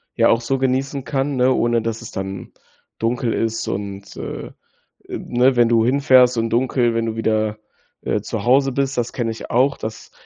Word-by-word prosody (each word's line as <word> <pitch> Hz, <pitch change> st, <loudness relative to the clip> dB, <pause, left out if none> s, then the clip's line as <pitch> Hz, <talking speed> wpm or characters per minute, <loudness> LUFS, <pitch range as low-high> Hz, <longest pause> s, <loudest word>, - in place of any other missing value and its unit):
ja, -, -, +4 dB
auch 115 Hz, -, +3 dB
so 135 Hz, +3 st, -1 dB
genießen 135 Hz, +1 st, -1 dB
kann, 135 Hz, +3 st, -1 dB
ne, 125 Hz, +1 st, +3 dB
ohne 120 Hz, -1 st, +1 dB
dass 115 Hz, 0 st, -3 dB
es 115 Hz, -, -9 dB
dann 95 Hz, -1 st, -6 dB, 0.5 s
dunkel 115 Hz, 0 st, 0 dB
ist 115 Hz, 0 st, -2 dB
und, 100 Hz, 0 st, -5 dB
äh, -, -, -6 dB
äh, -, -, -13 dB, 0.6 s
ne, 125 Hz, +2 st, +1 dB
wenn 120 Hz, -1 st, +4 dB
du 115 Hz, -1 st, +3 dB
hinfährst 130 Hz, -2 st, +4 dB
und 115 Hz, 0 st, 0 dB
dunkel, 120 Hz, 0 st, +1 dB
wenn 115 Hz, 0 st, 0 dB
du 110 Hz, -, -3 dB
wieder, 110 Hz, -1 st, 0 dB, 0.4 s
äh, -, -, -1 dB
zu -, -, -4 dB
Hause 135 Hz, +3 st, +3 dB
bist. 135 Hz, +1 st, -1 dB
Das 120 Hz, -1 st, -1 dB
kenne 115 Hz, -3 st, -2 dB
ich 110 Hz, -, -8 dB
auch. 135 Hz, +4 st, +2 dB
Das 110 Hz, 0 st, -7 dB
120 Hz, 195 wpm, -20 LUFS, 115-130 Hz, 0.6 s, ja